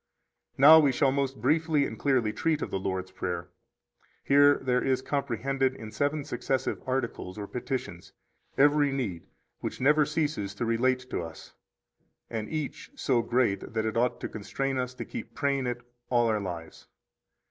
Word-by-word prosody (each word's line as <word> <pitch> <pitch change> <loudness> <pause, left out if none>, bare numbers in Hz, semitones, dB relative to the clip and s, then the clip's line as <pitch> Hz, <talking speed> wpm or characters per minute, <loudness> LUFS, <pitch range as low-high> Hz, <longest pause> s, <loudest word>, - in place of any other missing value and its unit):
34 - - -6
Now 160 +1 +11
we 140 - +4
shall 135 +1 +2
most 135 -2 -1
briefly 150 +3 +2
and - - -6
clearly 125 -6 +1
treat 155 +7 0
of - - -5
the 95 - -1
Lord's 95 -1 -3
Prayer. 85 -1 -4 0.7
Here 145 +1 +6
there 125 -1 +1
is 130 -1 +1
comprehended 135 -1 -1
in 110 -3 -9
seven 145 +3 -1
successive 130 +2 -2
articles, 120 -7 -3
or 105 - -4
petitions, 125 -6 -5 0.5
every 145 0 +4
need 105 -12 -3 0.3
which - - -5
never 150 +2 +4
ceases 150 -11 -2
to 120 - -2
relate 125 +3 +1
to - - -1
us, 80 -1 -10 0.8
and 110 -2 -3
each 150 -2 -4
so 130 - +1
great 120 -5 0
that 110 0 0
it 110 - -2
ought 120 +1 +1
to - - -2
constrain 135 +5 -3
us 125 0 -3
to - - -6
keep 235 -3 -8
praying 140 -3 0
it 120 0 -3 0.3
all 120 -1 +3
our 110 -1 +1
lives. 85 -4 -7
130 Hz, 170 wpm, -28 LUFS, 110-140 Hz, 0.8 s, Now